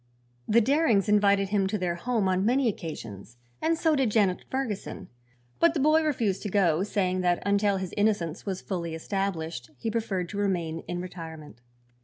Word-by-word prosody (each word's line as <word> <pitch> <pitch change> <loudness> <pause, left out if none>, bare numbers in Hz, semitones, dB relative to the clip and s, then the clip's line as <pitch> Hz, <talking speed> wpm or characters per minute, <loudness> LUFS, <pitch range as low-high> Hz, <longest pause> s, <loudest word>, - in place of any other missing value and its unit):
The 235 +2 +5
Darings 255 - +3
invited 200 -2 +3
him 200 -2 +1
to 210 +2 -1
their 180 -3 -1
home 215 +3 -1
on 185 0 +1
many 250 +4 +2
occasions, 120 - -6 0.2
and 330 0 +1
so 320 -1 +2
did 265 -5 +2
Janet 205 -4 +1
Ferguson; 260 -7 -4 0.5
but 335 0 +4
the - - +1
boy 310 +3 +4
refused 230 -11 0
to 205 - -4
go, 180 -5 +2
saying 185 -2 0
that 175 -1 +1
until 200 0 +2
his 190 -2 -5
innocence 205 -6 0
was 190 -2 -4
fully 170 -4 -4
established 165 - -3
he 225 - -3
preferred 200 -6 -2
to 205 - -5
remain 170 -5 -1
in 175 0 -3
retirement. 160 - -9
195 Hz, 175 wpm, -27 LUFS, 175-220 Hz, 0.5 s, The